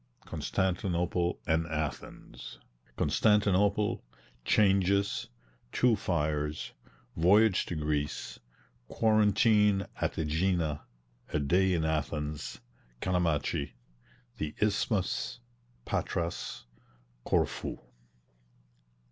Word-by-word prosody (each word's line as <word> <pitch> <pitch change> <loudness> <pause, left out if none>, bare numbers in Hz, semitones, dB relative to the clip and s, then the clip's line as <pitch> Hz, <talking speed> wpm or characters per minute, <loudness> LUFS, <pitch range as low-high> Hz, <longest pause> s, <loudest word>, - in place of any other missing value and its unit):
CONSTANTINOPLE 90 -2 -1
AND 80 +1 +1
ATHENS. 75 -5 -6 0.4
CONSTANTINOPLE 105 +1 +2 0.4
CHANGES 100 - +2 0.4
TWO 125 -2 +3
FIRES 75 -5 -2 0.5
VOYAGE 100 +4 +4
TO 85 - -3
GREECE 75 -1 -2 0.5
QUARANTINE 105 - +3
AT - - -2
AEGINA 80 -1 0 0.5
A 75 - +2
DAY 90 +6 +2
IN 80 -2 0
ATHENS 75 -1 -3 0.4
CALAMACHI 85 -6 0 0.6
THE 75 -7 -4
ISTHMUS 105 +1 0 0.5
PATRAS 85 -6 -3 0.6
CORFU. - - -1
90 Hz, 70 wpm, -30 LUFS, 75-100 Hz, 0.6 s, VOYAGE